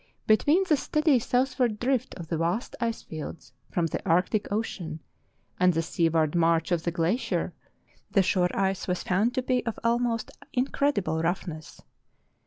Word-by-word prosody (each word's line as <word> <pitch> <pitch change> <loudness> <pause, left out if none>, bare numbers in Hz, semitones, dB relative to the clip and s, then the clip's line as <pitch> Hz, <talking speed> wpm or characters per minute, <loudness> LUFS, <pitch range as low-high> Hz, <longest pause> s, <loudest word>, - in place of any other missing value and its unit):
Between 290 - +4
the 305 -4 +4
steady 305 -1 +2
southward 250 -2 +1
drift 255 0 0
of 170 -3 -8
the 165 - -1
vast 170 +8 -1
ice 230 -1 -1
fields 155 +1 -8 0.2
from 175 - 0
the 165 - -3
Arctic 190 +4 +1
Ocean 180 -7 -3 0.6
and 180 0 +5
the 165 - +1
seaward 160 -2 +1
march 165 0 +2
of 175 -2 +2
the 170 - -1
glacier 170 +9 0 0.6
the 195 -1 +3
shore 180 -1 +2
ice 195 -1 0
was 180 -1 -1
found 210 +7 +1
to 255 - 0
be 255 -1 +1
of 230 -2 -3
almost 235 0 0 0.2
incredible 250 - 0
roughness. 165 -2 -3
195 Hz, 155 wpm, -27 LUFS, 170-245 Hz, 0.6 s, and